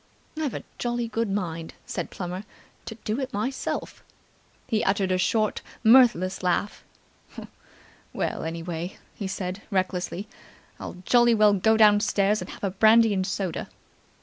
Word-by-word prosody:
"I've 305 -6 -2
a - - -5 0.2
jolly 240 -1 -1
good 225 -1 -2
mind," 165 -5 -3
said - - -4
Plummer, 180 +1 -5 0.4
"to 225 - -6
do 215 +4 -1
it 265 -1 -3
myself!" 255 +7 -3 0.6
He 220 -4 0
uttered 195 -1 +1
a 185 - +1
short, 215 +3 +1 0.2
mirthless 225 -6 +5
laugh. 185 +3 -1 1.3
"Well, - - -3
anyway," 165 +2 -5 0.2
he 200 - -5
said 190 +1 -4
recklessly, 185 0 -2 0.5
"I'll - - -7
jolly 240 -1 +5
well 210 -1 +5
go 220 +3 +3
downstairs 210 -1 +4
and - - -7
have - - -11
a 195 - 0
brandy 220 +3 +5
and 190 -1 -1
soda!" 190 -3 -3
205 Hz, 140 wpm, -25 LUFS, 185-225 Hz, 1.3 s, mirthless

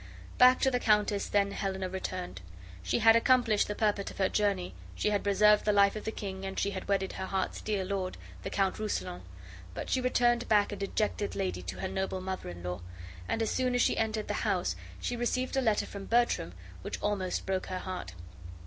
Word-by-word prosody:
Back 255 +1 +7
to 265 - +3
the 250 - +1
countess 210 -3 +2
then 200 -1 +2
Helena 190 -2 -2
returned. 185 - -5 0.4
She 90 - 0
had 225 0 +6
accomplished 230 -3 +4
the 205 - -3
purport 205 -2 0
of - - -12
her 190 -1 +2
journey, 200 - 0 0.2
she 210 - 0
had 205 - 0
preserved 210 +1 +5
the 210 - +3
life 200 0 +4
of 215 - -6
the 220 - -1
king, 190 -3 -6
and 195 0 -5
she 200 - 0
had 190 -1 -6
wedded 195 -1 0
her 190 - -4
heart's 190 -1 -2
dear 205 -3 -1
lord, 185 -1 -3 0.2
the - - -4
Count 195 0 0
Rousillon; 205 - -3 0.5
but - - -5
she 260 - +2
returned 240 -1 +2
back 205 -2 +4
a - - -3
dejected 205 +1 -2
lady 90 -1 -2
to 90 +1 -6
her - - -1
noble 190 0 -2
mother 185 - -5
in 85 0 -9
law, 90 0 -4 0.5
and 225 - 0
as 220 - -1
soon 255 -1 +1
as 245 - +3
she - - +2
entered 220 -1 -1
the - - -1
house - - 0 0.2
she 245 - -2
received 255 +2 -1
a 270 - +3
letter 220 -4 +2
from 200 -1 -8
Bertram 235 - +1 0.3
which - - -5
almost 195 -3 -1
broke 190 -1 -1
her 185 - -3
heart. 185 0 -5
200 Hz, 210 wpm, -30 LUFS, 190-220 Hz, 0.5 s, Back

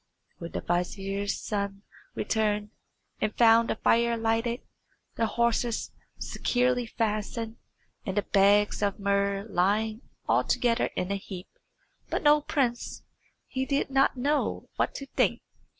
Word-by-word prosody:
When 170 0 -7
the - - -2
vizier's 195 +3 -1
son 200 -1 -3 0.3
returned, 210 -1 0 0.5
and 215 - -1
found 230 0 +6
the - - +1
fire 235 +1 +2
lighted, 230 +2 0 0.5
the 225 - +1
horses 235 0 0 0.3
securely 245 -1 0
fastened, 225 +1 -2 0.5
and 190 -2 -4
the 205 - +3
bags 205 +1 +3
of 200 -1 0
muhrs 200 0 +1
lying 215 +5 +1 0.3
altogether 235 -2 +2
in 180 +2 -2
a 200 - 0
heap, 190 -1 -9 0.6
but - - -1
no 295 0 +6
prince, 255 -5 -1 0.4
he 260 - -2
did 275 0 -1
not 270 0 +3
know 290 +4 0
what - - 0
to 275 - -5
think. - - 0
220 Hz, 130 wpm, -28 LUFS, 200-240 Hz, 0.6 s, found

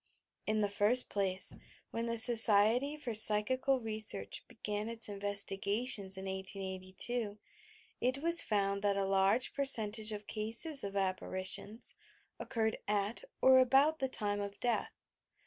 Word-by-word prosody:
In 215 0 0
the 205 - +1
first 205 +5 +1
place, 190 -2 +1 0.4
when 230 +1 -4
the 230 0 -3
Society 230 +4 +4
for 250 -6 -6
Psychical 255 +6 +5
Re 220 -2 -6
search 100 - -1
began 210 0 -6
its 230 -1 -6
investigations 200 +1 -2
in 190 - -8
1882, 190 +3 -4 0.6
it 255 +2 0
was 335 +4 +6
found 200 -2 -2
that 200 -1 0
a 195 - -1
large 195 +5 +1
percentage 220 -6 +1
of 210 0 -8
cases 230 +9 -1
of 200 0 -7
apparitions 190 +3 -2 0.5
occurred 220 -3 -3
at 205 +2 -2 0.2
or 260 0 +6
about 275 +5 +2
the 265 - -2
time 205 -4 -3
of 200 0 -8
death. 240 -1 -1
215 Hz, 135 wpm, -32 LUFS, 200-245 Hz, 0.6 s, was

